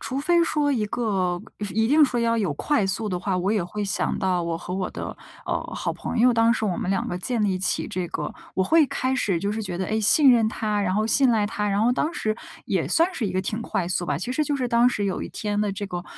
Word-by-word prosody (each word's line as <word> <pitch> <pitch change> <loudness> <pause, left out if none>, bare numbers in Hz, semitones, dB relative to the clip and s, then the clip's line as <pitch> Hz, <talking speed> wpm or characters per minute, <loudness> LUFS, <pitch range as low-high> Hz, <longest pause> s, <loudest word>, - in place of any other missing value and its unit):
除 265 +1 -3
非 340 +4 +3
说 295 -3 +1
一 225 -5 0
个 190 -6 -1 0.3
一 220 +3 +2
定 295 +4 +6
说 245 -3 -1
要 230 0 +2
有 200 -8 0
快 285 - +1
速 210 +3 -2
的 180 -3 -2
话， 185 0 -1
我 185 +2 0
也 210 -5 +1
会 205 +4 -4
想 195 - -1
到 185 -2 0
我 170 -1 -2
和 180 +1 -6
我 190 -1 -2
的， - - -6 0.3
呃， - - -1
好 - - -2
朋 - - -4
友， 245 +1 +5
当 230 0 +4
时 220 - -2
我 185 -5 0
们 185 - -2
2 195 - 0
个 175 - -3
建 225 +4 -2
立 195 -3 +1
起 185 - 0
这 185 -4 -3
个 - - -4 0.2
我 190 - +1
会 320 - +5
开 260 0 -1
始 200 -9 0
就 200 +4 -2
是 220 +1 -3
觉 175 -3 -4
得， 190 - -2
哎， 220 +1 0
信 265 +6 +6
任 225 -2 +3
他， 210 -2 -1
然 185 -2 0
后 215 +2 +1
信 265 +2 +4
赖 215 -3 +2
他， 210 -1 -2
然 200 +1 +1
后 245 +2 +3
当 310 +6 -1
时 215 -8 -2 0.3
也 - - -1
算 335 +2 +3
是 230 - -1
一 - - -2
个 185 - 0
挺 215 +4 -3
快 180 - -2
速 180 -1 -1
吧。 145 -3 -1
其 245 +8 -3
实 305 - +1
就 290 -1 -1
是 255 - -1
当 235 +1 +4
时 205 -4 -2
有 195 - -2
一 - - -5
天 205 -1 -3
的 210 -1 0
这 200 +1 -5
个， 175 -2 -5
210 Hz, 295 characters per minute, -24 LUFS, 190-240 Hz, 0.3 s, 定